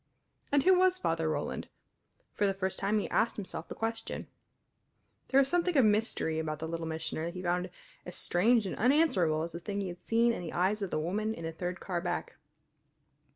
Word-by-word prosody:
And 285 -1 +4
who 375 - +6
was 370 0 +4
Father 165 - 0
Roland? 155 - -3 0.7
For 205 - +1
the 195 - 0
first 190 -1 -2
time 200 +2 +1
he 210 - -1
asked 230 - +2
himself 200 -3 -6
the - - -7
question. 225 0 -3 1.0
There 270 - +4
was 275 - +4
something 350 0 +1
of 260 - +6
mystery 210 -7 +1
about 155 -1 -2
the 160 +2 -5
Little 165 0 -4
Missioner 160 0 -3
that 170 +2 -5
he 180 - -5
found 180 +1 0 0.3
as 180 - -8
strange 220 +5 +3
and 190 - -3
unanswerable 205 - +3
as 170 - -4
the 170 - -6
thing 200 +4 -4
he 195 -2 -2
had 175 0 -9
seen 235 +1 +3
in - - -4
the 170 - -6
eyes 195 +4 +1
of 195 - -2
the - - -1
woman 210 +8 -1
in 165 - -8
the 165 - -3
third 175 +2 -4
car 175 -3 -3
back. 175 0 -3
190 Hz, 210 wpm, -31 LUFS, 170-225 Hz, 1.0 s, who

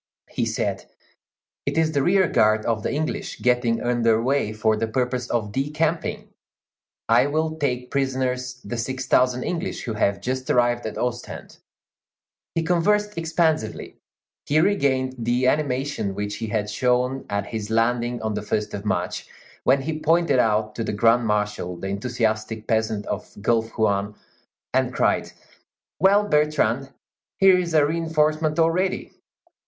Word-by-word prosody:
He - - -1
said: - - -2 0.8
"It - - -2
is 160 -1 +3
the 140 -2 +1
rear 185 +4 +3
guard 110 -4 +3
of 115 -2 0
the - - -2
English 155 +2 -3
getting 120 -2 +1
under 115 -2 +2
way 130 -2 0
for 110 0 +1
the 110 +1 -1
purpose 125 +1 -1
of 110 -3 -1
decamping. 150 +6 -1 0.8
I 120 +4 +4
will 155 +2 -1
take 125 -4 -2
prisoners 130 -2 -1
the 120 +4 -4
six 130 +3 -3
thousand 125 0 +2
English 180 +2 -3
who 115 - -3
have 100 -2 +1
just 130 +1 -3
arrived 120 -1 +2
at - - -6
Ostend." 125 0 -5 1.0
He 165 - +1
conversed 205 +5 +1
expansively; 160 -7 -1 0.5
he 150 +2 +3
regained 135 -8 +1
the 120 +2 +1
animation 135 -6 0
which 105 0 -3
he 110 - -4
had 105 -1 -1
shown 125 +4 0
at 100 0 -1
his 105 0 -5
landing 120 +1 0
on 110 -1 -1
the - - -3
first 105 0 -2
of 100 - -5
March, 90 -4 -2 0.4
when 135 0 +3
he 155 +2 -3
pointed 165 -3 +3
out 110 -2 +1
to 115 - -3
the - - -3
Grand 115 +2 +3
Marshal 105 -4 -1
the 95 +3 -5
enthusiastic 110 0 -2
peasant 110 -2 0
of - - -5
the - - -12
Gulf 115 +1 0
Juan, 100 -1 +1 0.6
and - - +2
cried, - - +1 0.7
"Well, 200 +2 +4
Bertrand, 150 - +1 0.5
here 190 -1 +6
is 170 -2 -2
a 150 -2 +5
reinforcement 155 -1 0
already!" 170 +3 +1
125 Hz, 150 wpm, -23 LUFS, 110-150 Hz, 1.0 s, here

